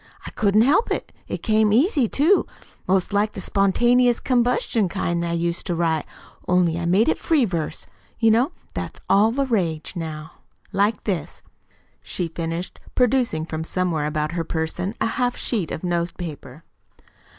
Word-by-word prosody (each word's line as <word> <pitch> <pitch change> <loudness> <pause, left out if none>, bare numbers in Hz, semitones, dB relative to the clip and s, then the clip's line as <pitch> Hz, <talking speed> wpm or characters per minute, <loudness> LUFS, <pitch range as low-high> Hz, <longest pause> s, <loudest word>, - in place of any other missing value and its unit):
I - - -7
couldn't 215 -1 +3
help 305 - +3
it. - - -3 0.2
An' - - -2
it - - -10
came 215 -1 +3
easy, 270 - +3
too 330 +8 +3 0.4
'most 190 +1 +1
like 210 +1 +1
the - - -6
spontaneous 240 +6 +3
combustion 240 -5 +1
kind 175 -2 -1
that 170 - -2
I - - -1
used 170 +1 -1
to 175 - -1
write, 165 -2 0 0.4
only 175 -2 +2
I 170 - -3
made 195 +6 +3
it 320 - +1
free 305 -7 +2
verse. 170 -6 -3 0.3
You 225 -1 +4
know 245 +8 +3 0.2
that's - - -5
all 205 +3 +5
the 275 +3 0
rage 175 - -1
now. 160 -1 -6 0.4
Like 205 +2 +1
this," 185 -7 -4 0.6
she 175 - -3
finished, 165 +2 -4 0.2
producing 245 -10 +2
from 160 -1 -4
somewhere 165 -3 -1
about 150 0 -2
her 170 -1 -2
person 165 +5 -3
a - - +1
half 245 +2 -1
sheet 205 -10 -1
of - - -5
note 170 -1 -1
paper. 155 -3 -8
190 Hz, 170 wpm, -23 LUFS, 165-230 Hz, 0.6 s, all